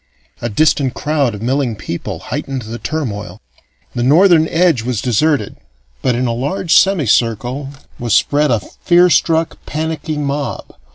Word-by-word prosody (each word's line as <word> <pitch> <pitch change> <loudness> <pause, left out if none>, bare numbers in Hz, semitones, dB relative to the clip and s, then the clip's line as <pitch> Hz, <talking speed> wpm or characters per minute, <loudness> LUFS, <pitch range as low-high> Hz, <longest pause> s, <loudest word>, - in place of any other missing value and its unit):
A 120 - -2
distant 135 +2 +1
crowd 145 -6 0
of 105 - -8
milling 130 -1 0
people 85 -4 -5
heightened 135 -3 -5
the 115 +2 -7
turmoil. 125 -10 -4 0.5
The 120 - -3
northern 160 +5 +5
edge 165 -7 +2
was 120 -1 -2
deserted, 125 0 0 0.4
but 125 - +1
in 125 +2 0
a 120 - 0
large 160 +9 -1
semicircle 130 - +2 0.3
was 120 -2 +1
spread 150 +1 +2
a 115 -4 +1
fear 175 - +2
struck, 165 +1 +1
panicky 155 0 -3
mob. 145 -1 -3
140 Hz, 140 wpm, -16 LUFS, 120-160 Hz, 0.5 s, northern